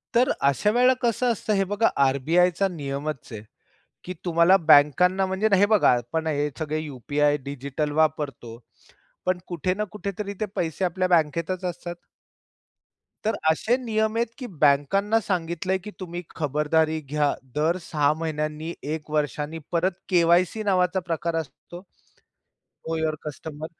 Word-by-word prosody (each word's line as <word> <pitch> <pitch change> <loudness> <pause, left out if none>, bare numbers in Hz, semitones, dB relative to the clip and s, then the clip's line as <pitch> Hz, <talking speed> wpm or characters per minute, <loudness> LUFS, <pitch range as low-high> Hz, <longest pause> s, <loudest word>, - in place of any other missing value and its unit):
तर 250 +3 +4
अशा 140 +9 +2
वेळेला 250 +2 +4
कसं 240 +1 +1
असतं, 215 -1 -2
हे 195 - +2
बघा 205 +4 +1 0.2
आर-बी-आयचा 170 +8 +2
नियमच 145 -4 -5
आहे, 105 -2 -7 0.6
की 180 - -5
तुम्हाला 170 +2 +5
बँकांना 160 +4 +4
म्हणजे 190 +3 0
ना 195 - +6
हे 200 - +5
बघा, 210 - +4
आपण 160 +7 -3
हे 150 -1 0
सगळे 155 0 -2
यू-पी-आय 145 +1 0
डिजिटल 140 +2 -3
वापरतो. 140 -7 -2 0.7
पण 185 0 +1
कुठे 175 +1 -1
ना 210 +2 -2
कुठे 205 -1 -4
तरी 200 -1 -3
ते - - +2
पैसे 170 +2 -1
आपल्या 185 +1 0
बँकेतच 170 +2 +1
असतात. 175 0 -5 1.3
तर 220 -1 +1
असे 220 +9 +2
नियम 220 -3 -1
आहेत 235 - +1
की 255 -3 -6
बँकांना 195 +10 +3
सांगितलंय 180 0 -1
की 210 - -7
तुम्ही 175 -1 -5
खबरदारी 155 +1 +1
घ्या. 145 0 0 0.2
दर 160 +4 +1
6 150 -3 +1
महिन्यांनी, 155 +1 -3
1 150 +1 -4
वर्षांनी 150 +1 -2
परत 175 +3 +2 0.2
के-वाय-सी 175 +4 +3
नावाचा 185 -2 +2
प्रकार 165 0 -2
असतो, 165 +2 -6 1.1
नो 165 - -1
युवर 160 -1 0
कस्टमर 150 +1 -6
165 Hz, 145 wpm, -25 LUFS, 150-190 Hz, 1.3 s, ना